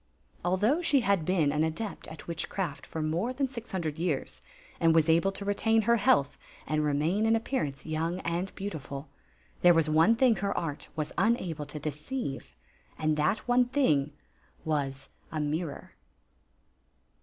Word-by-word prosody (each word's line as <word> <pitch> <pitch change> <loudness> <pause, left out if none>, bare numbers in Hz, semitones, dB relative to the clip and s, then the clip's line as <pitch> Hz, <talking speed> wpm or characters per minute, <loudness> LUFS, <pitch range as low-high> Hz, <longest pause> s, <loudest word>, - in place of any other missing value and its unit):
Although 205 - +2
she 290 -6 +3
had 195 -6 +1
been 165 -5 +2
an 150 +2 +1
adept 165 +7 -3
at 160 - -10
witchcraft 170 -1 -4
for 160 - -4
more 170 +11 -1
than 270 +1 0
six 245 -2 -8
hundred 160 -5 -3
years, 165 -5 -2 0.4
and 165 -1 +4
was 160 -1 +4
able 165 +4 +4
to 200 - -5
retain 225 +2 +2
her 235 +2 +4
health 140 -9 +2 0.3
and 155 0 0
remain 155 +9 +1
in 225 - +4
appearance 225 - -2
young 165 +3 -2
and 175 +3 -2
beau 200 +1 -3
tiful, 140 -3 -7 0.5
there 175 -1 +7
was 155 -2 +3
one 165 +9 +5
thing 235 -2 +4
her 200 +2 -1
art 150 -4 -3
was 155 -2 -3
unable 175 -10 0
to 150 - -7
de 150 +1 -2
ceive, 145 - -5 0.4
and 155 0 +1
that 155 +11 0
one 245 0 +4
thing 155 - +2 0.5
was 135 -3 -2 0.2
a 160 - -2
mirror. 150 +1 -3
165 Hz, 165 wpm, -29 LUFS, 150-210 Hz, 0.5 s, there